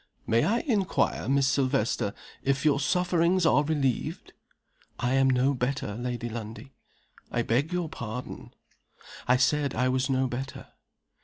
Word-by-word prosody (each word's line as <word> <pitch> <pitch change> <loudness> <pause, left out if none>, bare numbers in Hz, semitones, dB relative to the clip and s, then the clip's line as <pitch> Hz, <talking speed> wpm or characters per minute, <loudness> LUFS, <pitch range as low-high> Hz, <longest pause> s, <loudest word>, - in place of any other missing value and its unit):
"May 115 +1 +2
I 230 +4 +1
inquire, 210 - 0
Miss 140 0 +3
Silvester, 130 -6 0 0.3
if 140 +1 0
your 140 -2 +4
sufferings 180 +2 +2
are 145 -2 +4
relieved?" 140 -5 -2 0.6
"I 125 +1 0
am 135 0 +4
no 130 +2 +3
better, 125 -4 -2
Lady 120 +1 -4
Lundie." 115 +3 -7 0.6
"I 120 - 0
beg 130 +9 0
your 180 -2 -1
pardon?" 125 -3 -7 0.8
"I 125 +1 +5
said 140 +2 +1
I 125 0 +1
was 130 +1 0
no 130 0 +2
better." 130 +2 -6
135 Hz, 140 wpm, -27 LUFS, 125-150 Hz, 0.8 s, I